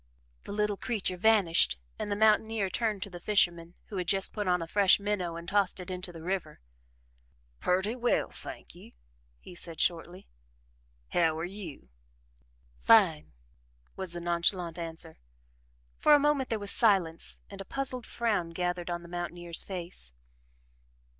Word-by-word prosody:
The - - -7
little 210 0 0
creature 210 -6 -2
vanished 180 - +3 0.2
and 205 - -3
the - - +1
mountaineer 215 -1 +3
turned 215 -4 -1
to - - -7
the 175 - -8
fisherman, 175 -3 +1
who 200 - -5
had 180 -1 -2
just 195 +1 +1
put 210 -3 -3
on 180 0 +3
a 165 - -3
fresh 200 +2 +5
minnow 200 -5 -2
and 170 0 -8
tossed 200 -2 +1
it 180 0 -7
into 180 0 -5
the 165 -2 -10
river. 180 -4 -3 1.0
"Purty 190 +5 +1
well, 245 -1 +1
thank - - -9
you," - - -14 0.5
he - - -12
said 170 -2 -4
shortly. 175 +2 -1 0.8
"How 165 -2 +2
are 165 - -2
you?" 175 - -8 0.9
"Fine!" 185 -9 +4 0.6
was 190 -3 -2
the 175 - -4
nonchalant 170 0 +1
answer. 165 -1 -7 0.8
For 300 - +7
a - - +5
moment 285 -2 +1
there 225 - 0
was 205 -1 -2
silence 190 -8 +1
and 195 -1 -6
a - - -5
puzzled 255 +1 -2
frown 215 -8 -1
gathered 175 0 -2
on 175 0 -3
the - - -11
mountaineer's 175 -1 -2
face. 170 - -3
185 Hz, 155 wpm, -30 LUFS, 170-210 Hz, 1.0 s, For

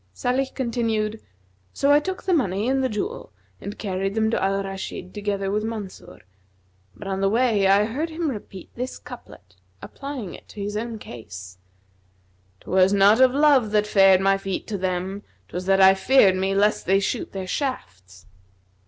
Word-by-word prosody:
(Salih 255 - 0
continued) 225 -4 -1 0.5
So 280 - +2
I 290 - +6
took 375 +5 -5
the 375 - +1
money 210 - 0
and 265 0 +1
the 260 - +1
jewel 395 - -5 0.3
and 200 - -7
carried 195 0 -3
them 220 0 +1
to - - 0
al 195 +1 0
Rashid 190 -1 -7
together 200 -2 -2
with 210 +1 -1
Mansur, 220 -4 -7 0.7
but 150 - -9
on 195 0 -2
the 195 - +3
way 220 -3 +2
I 200 +2 +4
heard 285 +9 -3
him 320 -2 -2
repeat 200 -5 -9
this 250 +2 -5
couplet, - - -13 0.2
applying 275 -8 -7
it - - -13
to - - -11
his 205 +1 -4
own 225 +1 -4
case, 95 - -10 1.0
''Twas 190 +1 +3
not 205 +5 +5
of 260 0 +5
love 285 -6 +4
that 210 0 +3
fared 195 -2 +5
my 195 0 +2
feet 195 -1 -4
to 210 - -2
them; 185 +2 -3
* - - -38
'Twas 180 +1 -5
that 195 0 +4
I 190 0 +8
feared 195 -1 +4
me 190 +1 -1
lest 205 +2 +1
they 195 +1 +4
shoot 200 - -3
their 190 -1 -5
shafts!' 95 - -5
205 Hz, 180 wpm, -23 LUFS, 190-245 Hz, 1.0 s, I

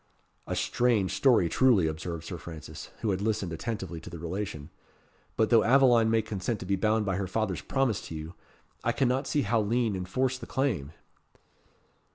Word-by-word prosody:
"A - - -2
strange 115 -6 +1
story 125 -10 +4
truly," 115 -2 +4
observed 80 +1 -4
Sir 85 0 -6
Francis, 80 -2 -9
who 110 - +1
had 95 0 -1
listened 100 -5 -1
attentively 95 -2 -4
to - - -9
the 85 - -8
relation; 85 -3 -5 0.7
"but 110 +1 +2
though 115 -2 +6
Aveline 120 -3 +5
may 110 0 +2
consent 105 +1 -3
to - - -5
be 100 +2 +1
bound 110 +2 +1
by 95 -2 0
her 100 -1 -2
father's 95 -2 -1
promise 135 -7 0
to 80 - -7
you, 80 +2 -7 0.5
I - - 0
see 135 - +2
not 130 +3 0
how 120 -6 +2
Lean 115 0 +1
enforce 130 +8 -1
the - - -9
claim." 105 - -1
105 Hz, 180 wpm, -28 LUFS, 90-120 Hz, 0.7 s, though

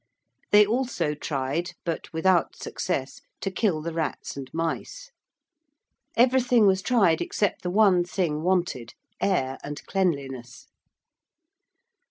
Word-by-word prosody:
They 210 0 +8
also 220 - -1
tried, 145 +3 -3
but 165 -2 -4
without 175 +2 +2
success, 140 -7 -4 0.2
to 195 - -2
kill 180 -5 0
the 170 0 -4
rats 160 -2 -3
and 135 -2 -8
mice. 165 - -4 1.1
Everything 245 -2 +4
was 190 -1 +3
tried 195 -9 +3
except 205 - -1
the 180 - -3
one 190 -2 +4
thing 175 -4 -1
wanted 175 -9 -1 0.3
air 135 -9 0
and 145 0 -7
cleanliness. 135 -10 -2
175 Hz, 115 wpm, -26 LUFS, 150-200 Hz, 1.1 s, They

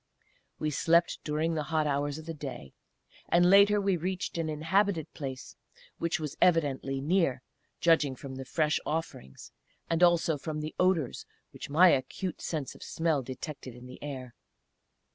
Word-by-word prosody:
We 155 - -1
slept 170 +4 +2
during 155 +2 0
the 155 - -1
hot 155 -2 +1
hours 145 0 -1
of 160 - -9
the 165 - -5
day; 135 - -8 0.6
and 175 +1 +5
later 200 +1 +6
we 195 -2 +1
reached 180 0 -3
an 160 -1 -1
inhabited 165 +2 0
place, 130 -3 -7 0.4
which 170 -1 0
was 150 -3 -5
evidently 140 -6 +2
near, 145 -4 +1 0.4
judging 155 -5 +3
from 130 +1 -8
the 130 0 -7
fresh 155 +2 +1
offerings, 150 - -5 0.4
and 165 +1 +1
also 170 -3 +4
from 155 +1 -4
the 155 +1 -5
odours 180 -8 +1 0.2
which 145 - -9
my 175 +6 +7
acute 170 +6 -1
sense 150 -5 -3
of - - -16
smell 160 -4 0
detected 130 0 -7
in 125 0 -12
the 125 0 -11
air. 130 -4 -6
155 Hz, 160 wpm, -29 LUFS, 140-170 Hz, 0.6 s, my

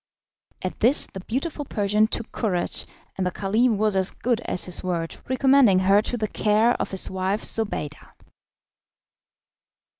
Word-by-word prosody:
At 185 - -4
this 250 +6 +3
the 190 - -9
beautiful 280 - -3
Persian 210 -3 +1
took 230 0 -4
courage, 185 -6 -1 0.3
and 185 -1 -1
the - - +1
Caliph 215 +5 +1
was 215 -1 +1
as 190 0 +2
good 240 -1 -1
as 180 - -1
his 180 - -2
word, 170 -3 -2
recommending 260 -6 +5
her 195 +2 +4
to 245 - -3
the 215 -2 -1
care 215 +3 +2
of - - -2
his 190 - -3
wife 190 +2 -2
Zobeida. 150 -9 -2
210 Hz, 150 wpm, -24 LUFS, 190-235 Hz, 0.3 s, recommending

